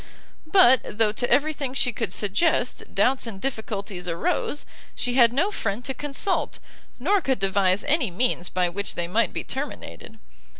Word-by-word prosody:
But 260 -10 +7 0.2
though 220 -2 +4
to 245 +3 -1
every 290 +5 +3
thing 275 -3 -4
she 250 -3 +2
could 220 -5 -3
suggest, 245 - 0
doubts 250 +5 +2
and 205 -4 -7
difficulties 200 -7 -4
arose, 170 - -1 0.3
she 245 - -2
had 240 -2 +6
no 325 +12 +1
friend 225 - -3
to 265 - -2
consult, 295 +7 -2 0.4
nor 380 +10 +2
could 265 -5 0
devise 195 0 +2
any 295 - +1
means 180 -2 -1
by 180 -1 +1
which 200 +3 -3
they 170 - -2
might 225 +6 +1
be - - -4
terminated. 270 +3 -7
240 Hz, 165 wpm, -24 LUFS, 195-275 Hz, 0.4 s, But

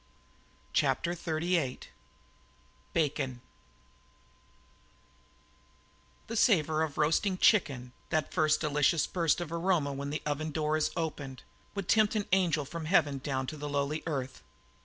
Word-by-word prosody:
CHAPTER 170 - +1
XXXVIII 165 -4 -1 1.1
BACON 135 -5 -1 2.9
The 230 - -6
savour 160 -9 +3
of 155 -3 -2
roasting 165 +5 +2
chicken, 140 - +2 0.2
that 155 -3 -1
first 155 -3 +3
delicious 150 0 +2
burst 170 -3 +1
of 170 -2 -5
aroma 170 -4 +1
when 140 +1 -4
the 150 - -4
oven 150 +1 -2
door 155 0 0
is 155 - +1
opened, 145 -5 -4 0.3
would 200 -3 -4
tempt 215 0 +3
an 210 -2 0
angel 175 -6 +2
from 165 +3 -6
heaven 145 -5 +2
down 130 -1 -2
to 155 - -6
the 145 0 -5
lowly 145 +2 -1
earth. 135 -4 -3
155 Hz, 125 wpm, -30 LUFS, 145-170 Hz, 2.9 s, savour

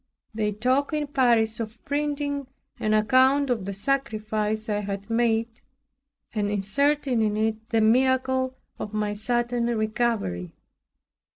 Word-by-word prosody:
They 215 -1 0
talked 255 +8 0
in 300 -1 0
Paris 235 -6 +2
of 225 0 -5
printing 285 -1 -2 0.3
an 215 0 +1
account 260 +5 +4
of 220 -6 -1
the 200 - -3
sacrifice 215 -2 -1
I 210 -1 0
had 200 +1 -5
made, 230 0 +1 0.7
and 205 -2 0
inserting 255 +5 +1
in 210 -1 +1
it 220 +1 -1
the 225 -2 +2
miracle 260 +2 +2 0.2
of 210 0 -5
my 210 -1 0
sudden 240 +2 0
recovery. 215 - -1
225 Hz, 125 wpm, -25 LUFS, 215-260 Hz, 0.7 s, account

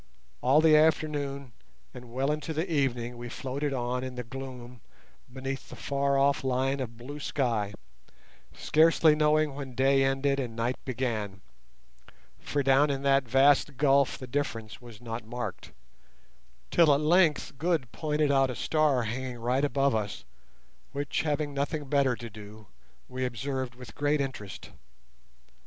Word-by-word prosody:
All 135 +5 +4
the 160 -1 +6
afternoon 145 -4 +1 0.4
and 120 -1 -11
well 135 +4 0
into 150 +1 -3
the 160 +4 -2
evening 125 -4 -1
we 120 0 -7
floated 140 +4 -3
on 125 -1 -2
in 130 -1 -6
the 125 - -4
gloom 125 -1 -9 0.5
beneath 135 +1 -5
the - - -9
far 140 0 0
off 140 0 +2
line 130 +1 0
of 115 -3 -5
blue 140 +5 -8
sky, 115 -8 -1 0.8
scarcely 160 0 +4
knowing 150 -1 +2
when 135 -3 -7
day 135 +1 +3
ended 135 +1 +1
and 120 -4 -4
night 120 +2 -2
began, 110 -7 -3 1.0
for 145 -1 -2
down 135 +2 +4
in 135 -1 -2
that 135 -2 +3
vast 135 +2 +4
gulf 140 -1 +3
the 130 - -8
difference 120 -5 -4
was 120 -3 -13
not 115 -1 -5
marked, 120 +3 -6 1.0
till 165 -3 +5
at - - 0
length 155 -3 +2
Good 160 -8 0
pointed 150 -2 0
out 135 -1 +3
a 125 - -4
star 150 -4 +1
hanging 125 +2 -4
right 125 +4 0
above 140 -1 +2
us, 105 -2 -3 0.7
which, 140 0 -1
having 150 -1 -1
nothing 145 +2 -2
better 135 -2 +2
to 120 - -8
do, 105 +1 -12 0.4
we 130 0 -4
observed 130 +1 -3
with 125 -4 -11
great 145 +1 +1
interest. 130 -8 -5
135 Hz, 150 wpm, -28 LUFS, 125-145 Hz, 1.0 s, the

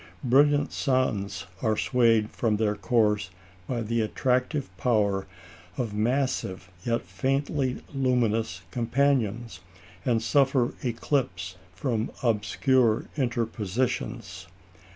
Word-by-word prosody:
Brilliant 145 +3 +4
suns 105 - 0 0.2
are 110 -1 +1
swayed 115 -4 +3
from 110 -3 0
their 105 -1 +1
course 105 0 +1 0.4
by 120 -2 -2
the 115 +1 0
attractive 125 - 0
power 100 -3 +1 0.5
of 115 -5 -2
massive 110 -5 -1
yet 115 -1 0
faintly 135 -1 -1
luminous 115 -8 0
companions, 120 -1 0 0.4
and 120 -3 +2
suffer 135 -2 +3
eclipse 115 -7 -1 0.2
from 120 -6 -1
obscure 115 +1 +2
interpositions. 115 - -2
115 Hz, 90 wpm, -27 LUFS, 105-130 Hz, 0.5 s, Brilliant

